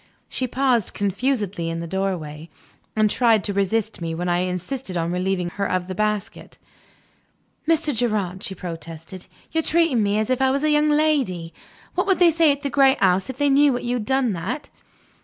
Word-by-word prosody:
She 255 - -2
paused 250 -4 +1
confusedly 200 -4 -1
in 165 0 -3
the 170 - -4
doorway, 170 -4 -3 0.5
and 215 0 +4
tried 225 -2 +3
to 200 - -2
resist 200 +1 -1
me 165 -1 -3
when 175 +2 -3
I 175 0 +1
insisted 185 +4 -3
on 170 0 -1
relieving 180 0 -1
her 200 +1 -2
of 180 -1 -1
the 190 - -4
basket. 210 +1 -3 1.1
"Mr. 315 -2 +3
Gerard," 210 -6 -1
she 190 - -5
protested, 165 0 -8 0.2
"you 325 - 0
are - - +3
treating 320 -7 +2
me 205 0 +1
as 215 +3 0
if 255 - +1
I 265 - +4
was 275 +2 0
a 305 - +3
young 300 0 +3
lady. 275 - +1 0.4
What - - 0
would 385 -3 +3
they 345 -1 +5
say 325 -1 +4
at 285 +1 -3
the 280 - -1
great 270 -1 +4
house, 190 +2 +2
if 260 - -6
they 285 0 +2
knew 280 -2 +4
you 245 0 -3
had 220 - -4
done 265 -4 +1
that?" 235 - -5
215 Hz, 195 wpm, -22 LUFS, 180-270 Hz, 1.1 s, they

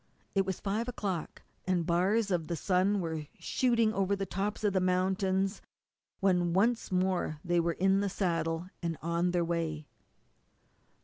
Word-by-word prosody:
It 195 -1 +1
was 190 - -2
five 210 +4 -1
o'clock, 195 -8 -4 0.2
and 180 -3 +1
bars 195 +6 +2
of 165 -3 0
the 170 - -2
sun 190 +4 +2
were 160 -3 -4
shooting 230 -4 +2
over 195 0 +1
the 195 0 -3
tops 200 +3 -3
of 205 -2 +2
the 190 - +3
mountains 190 +2 +1 0.6
when 180 -3 +2
once 225 +5 +2
more 185 -4 0
they 175 0 +2
were 170 0 +1
in 195 +2 +3
the 200 0 0
saddle 165 -3 -1
and 165 -2 -2
on 170 +2 +1
their 175 -1 +1
way. 165 -3 -2
185 Hz, 160 wpm, -31 LUFS, 170-195 Hz, 0.6 s, the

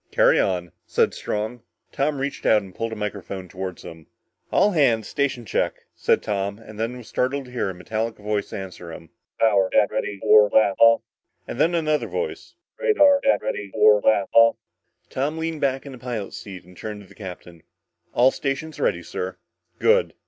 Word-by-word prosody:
"Carry - - +4
on," 90 -3 0 0.2
said - - +2
Strong. 110 +3 -4 0.3
Tom 145 +1 0
reached 140 +1 -4
out 105 -2 +4
and 95 -2 -12
pulled 115 +3 -3
a - - -4
microphone 100 -3 -5
toward 95 0 -6
him. 80 -2 -11 0.4
"All 210 - +4
hands! 125 - +2
Station 135 -4 -1
check!" - - 0 0.2
said - - +1
Tom, 100 -1 -2
and 110 -1 -13
then 115 +3 -2
was 120 - -12
startled 135 +2 -1
to 125 - -13
hear 120 -5 -1
a 95 - -6
metallic 110 +5 -3
voice 105 -1 -3
answer 90 -3 -7
him. 80 0 -11 0.3
"Power 100 -4 +3
deck, 105 -2 +3
ready 105 - -2
for 105 +1 +6
blast 100 -2 +3
off!" 115 0 +6 0.5
And - - -3
then 170 +2 +3
another 155 -2 0
voice: 465 0 -5 0.2
"Radar 360 - +5
deck, 275 - +2
ready 100 -1 -3
for 105 +1 +5
blast 100 -2 +2
off!" 115 0 +6 0.6
Tom 145 +4 -2
leaned 160 -1 -3
back 135 -1 0
in 140 - -8
the 130 - -11
pilot's 120 -5 -5
seat 95 -3 -9
and 90 0 -17
turned 105 +2 -7
to - - -18
the 100 - -17
captain. 90 -4 -10 0.5
"All 125 +2 +5
stations 145 +3 -4
ready, - - 0
sir." - - -5 0.4
"Good! 485 +2 +3
110 Hz, 185 wpm, -23 LUFS, 100-135 Hz, 0.6 s, for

